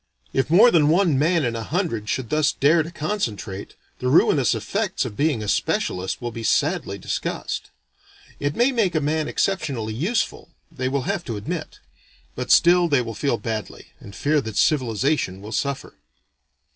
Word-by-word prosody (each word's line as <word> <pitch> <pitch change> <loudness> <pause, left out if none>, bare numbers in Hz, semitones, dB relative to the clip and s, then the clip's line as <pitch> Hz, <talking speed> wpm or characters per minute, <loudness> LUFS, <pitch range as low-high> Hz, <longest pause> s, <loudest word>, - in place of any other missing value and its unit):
If 135 0 0
more 215 +9 +7
than 150 -3 +4
one 165 -4 +3
man 165 0 +2
in 115 -1 -1
a 115 - -3
hundred 115 - -2
should 125 -4 -2
thus 155 -1 +3
dare 155 +4 +3
to 160 - -5
concentrate, 115 - -4 0.2
the 125 - -2
ruinous 135 -2 +4
effects 190 - -2
of 110 -5 -6
being 145 -5 0
a - - -5
specialist 95 -1 -1
will 120 -1 -4
be 115 - -7
sadly 145 - 0
discussed. 95 - -4 0.7
It 145 +1 -1
may 245 +3 +3
make 215 -9 +1
a - - +3
man 155 +1 -1
exceptionally 130 - -1
useful, 175 - -2 0.2
they 130 0 -2
will 135 -1 -1
have 195 +3 -2
to 115 -4 -4
admit; 100 - -6 0.5
but 125 0 -5
still 175 0 +5
they 140 -6 +2
will 115 -1 -6
feel 130 +2 0
badly, 110 -2 -5
and 100 - -12
fear 150 0 +1
that 110 -4 -6
civilization 130 -6 +1
will 105 +2 -9
suffer. 140 +3 -3
140 Hz, 170 wpm, -23 LUFS, 115-165 Hz, 0.7 s, more